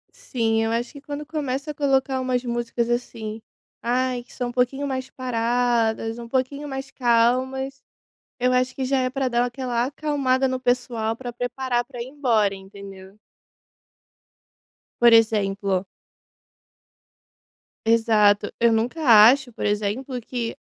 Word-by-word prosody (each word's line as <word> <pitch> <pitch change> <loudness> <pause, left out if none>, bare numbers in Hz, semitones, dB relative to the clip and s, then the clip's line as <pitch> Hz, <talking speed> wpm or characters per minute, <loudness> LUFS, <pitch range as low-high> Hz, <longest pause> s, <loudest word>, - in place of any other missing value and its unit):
Sim. 225 - 0
Eu 225 - -1
acho 235 +5 -2
que 280 - -11
quando 290 +1 -6
começa 290 -1 -3
a - - -8
colocar 270 -2 +1
umas 255 -1 0
músicas, 235 0 -2
assim. 225 -2 -3 0.4
Ai 250 0 0
que - - -19
são 245 -2 -3
um - - -5
pouquinho 255 +3 0
mais 260 -1 -4
paradas 235 -2 0
um 235 - -8
pouquinho 275 +3 -2
mais 270 0 -5
calmas. 260 +3 +1 0.6
Eu 250 +1 +2
acho 255 0 +1
que 265 - -3
já 270 0 +1
é 255 - 0
pra 265 -1 -1
dar 240 0 +1
aquela 245 -1 -2
acalmada 270 -2 0
no 260 0 -2
pessoal 245 -3 -1
pra 245 +1 -7
preparar 245 0 -2
pra 245 -2 -10
ir 240 - -7
embora. 230 -8 +1
Entendeu? 195 0 -12 1.8
Por 235 -1 +7
exemplo 200 -4 +2 2.0
Exato. 215 -3 +3
Eu 235 0 +4
nunca 235 +8 -1 0.3
acho, 265 -3 0
por - - -6
exemplo, 215 +5 -1
que 235 0 -4
245 Hz, 140 wpm, -23 LUFS, 225-265 Hz, 2.0 s, Por